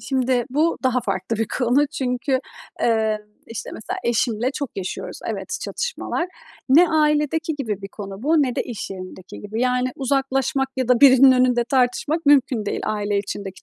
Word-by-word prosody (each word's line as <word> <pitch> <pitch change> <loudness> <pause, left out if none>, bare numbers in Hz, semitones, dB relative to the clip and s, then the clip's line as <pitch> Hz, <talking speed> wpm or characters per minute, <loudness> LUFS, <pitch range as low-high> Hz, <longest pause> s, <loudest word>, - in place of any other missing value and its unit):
Şimdi 255 -1 0
bu 310 +5 +1
daha 255 -1 +2
farklı 230 -1 -2
bir 225 - 0
konu. 255 +4 +3
Çünkü, 260 -2 -1 0.4
eee, 220 -2 +2 0.3
işte, 230 - -6
mesela 220 - -5
eşimle 235 +1 +1
çok 280 -1 -4
yaşıyoruz, 190 -1 -5
evet, - - -3
çatışmalar. 475 -7 -3 0.4
Ne 335 +7 +6
ailedeki 305 +1 +1
gibi 220 -8 -4
bir 195 - -6
konu 200 0 -8
bu 305 +2 +3
ne 255 -3 -1
de - - +1
iş 235 -4 -6
yerindeki 185 0 -9
gibi. 215 +3 -5
Yani, 250 0 +1
uzaklaşmak 270 +1 0
ya 260 -2 -1
da 250 -2 +4
birinin 265 -1 +8
önünde 250 -1 +3
tartışmak 265 +6 0
mümkün 260 -6 +4
değil - - -2
aile 205 -1 -1
içindeki 195 -1 -6
250 Hz, 165 wpm, -22 LUFS, 220-275 Hz, 0.4 s, birinin